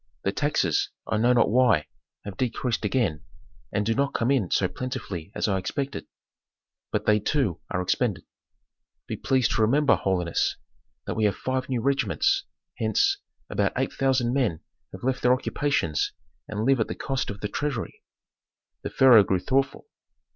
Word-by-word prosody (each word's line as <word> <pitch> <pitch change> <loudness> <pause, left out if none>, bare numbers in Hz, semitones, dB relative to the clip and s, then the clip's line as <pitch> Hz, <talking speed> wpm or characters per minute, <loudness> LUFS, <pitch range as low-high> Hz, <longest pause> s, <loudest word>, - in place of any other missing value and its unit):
"The 95 - +1
taxes, 100 - +1 0.2
I 110 - -1
know 120 +3 +3
not 120 -3 +3
why, 115 -10 +4 0.4
have 100 -2 -6
decreased 120 0 -1
again, 105 - 0 0.5
and 105 - 0
do 115 - +2
not 140 +3 0
come 120 +2 +1
in 120 -11 +1
so 95 - +2
plentifully 100 -8 -6
as - - 0
I 95 -2 +1
expected. 135 +8 -4 0.8
But - - -1
they 105 0 +4
too 105 - 0
are 90 - -1
expended. 95 -2 0 0.8
Be - - -4
pleased 130 -3 +1
to 115 - +1
remember, 140 +7 +4
holiness, 90 -3 0 0.5
that - - -2
we 110 - +1
have 100 - +2
five 130 0 -2
new 125 -3 0
regiments; 390 - +1 0.3
hence, 400 -1 +2 0.3
about - - 0
eight - - -1
thousand 130 -3 +1
men 120 - 0 0.3
have - - -10
left 130 0 0
their 125 - +5
occupations 130 - 0 0.3
and 105 +1 -3
live 135 -1 +3
at 110 - +1
the - - -5
cost 135 -1 -2
of 100 0 -7
the 105 - -1
treasury." 135 +1 -4 0.8
The - - -4
pharaoh 125 -6 +7
grew 95 -1 +1
thoughtful. 135 +7 0
120 Hz, 165 wpm, -26 LUFS, 100-135 Hz, 0.8 s, pharaoh